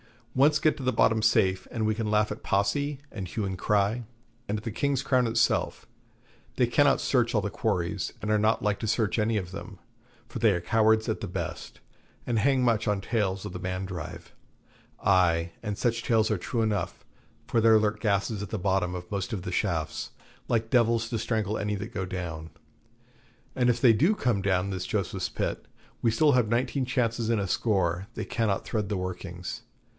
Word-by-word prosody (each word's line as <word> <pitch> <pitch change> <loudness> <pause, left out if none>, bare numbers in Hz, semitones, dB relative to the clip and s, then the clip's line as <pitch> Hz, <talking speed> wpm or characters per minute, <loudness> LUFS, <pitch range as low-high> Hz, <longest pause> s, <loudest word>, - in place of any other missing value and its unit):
Once 150 +3 +4
get 155 0 +2
to - - -7
the 130 0 0
bottom 110 0 +3
safe, 105 -4 +2
and 115 -3 -2
we 110 - +2
can 110 0 -2
laugh 105 0 +2
at 105 - -6
Posse, 140 +9 0
and 95 -4 -5
hue 105 +3 -3
and 95 -1 -3
cry, 105 +5 +1 0.4
and 105 - -1
at 105 - -8
the 115 - -3
King's 140 +3 0
Crown 130 -3 +2
itself. 115 0 +1 0.7
They - - +3
cannot - - +3
search - - +1
all - - +3
the - - -3
quarries, 90 +3 -1
and 105 - -2
are 105 - +3
not 110 +2 +2
like 105 -1 0
to 110 - -3
search 110 0 +1
any 110 +1 +1
of 90 -3 -4
them, 100 0 -8 0.5
for - - -6
they 110 -4 +4
are 85 - -1
cowards 110 +3 +3
at - - -1
the - - -4
best, - - -6 0.4
and 115 -2 0
hang 135 +2 +3
much 115 -2 +2
on 105 -2 +1
tales 95 -3 -1
of 105 - -5
the 90 - -6
Mandrive. 90 -2 -5 0.7
Ay, 85 -3 +3
and 105 -2 -4
such 115 -1 0
tales 110 -1 +2
are 110 - +1
true 115 +6 -2
enough, 105 -5 -2 0.4
for 115 - +1
there 110 0 +6
lurk 105 0 0
gases 100 0 0
at 105 - -5
the 110 - -2
bottom 95 -2 0
of 90 +1 -8
most 100 +3 -3
of 95 -5 -3
the - - -4
shafts, - - -2 0.4
like 115 -1 0
devils 115 -2 +3
to 115 - -2
strangle 110 -2 -1
any 105 0 -1
that 110 +4 -6
go 95 -2 -2
down. 85 -3 -5 1.0
And 125 -1 +2
if 120 0 +1
they 120 -3 +7
do 165 - +3
come 120 - 0
down 95 -1 +1
this 90 -1 -3
Joseph's 95 -3 -2
Pit, - - -3 0.3
we 115 - +3
still 145 +7 +4
have 125 -4 +3
nineteen 125 +4 0
chances 115 -3 0
in 115 - +2
a 100 -1 -1
score 95 -3 0
they - - -3
cannot 105 -4 -1
thread 105 -3 -2
the 105 - -1
workings. 90 -1 -5
105 Hz, 200 wpm, -27 LUFS, 95-115 Hz, 1.0 s, they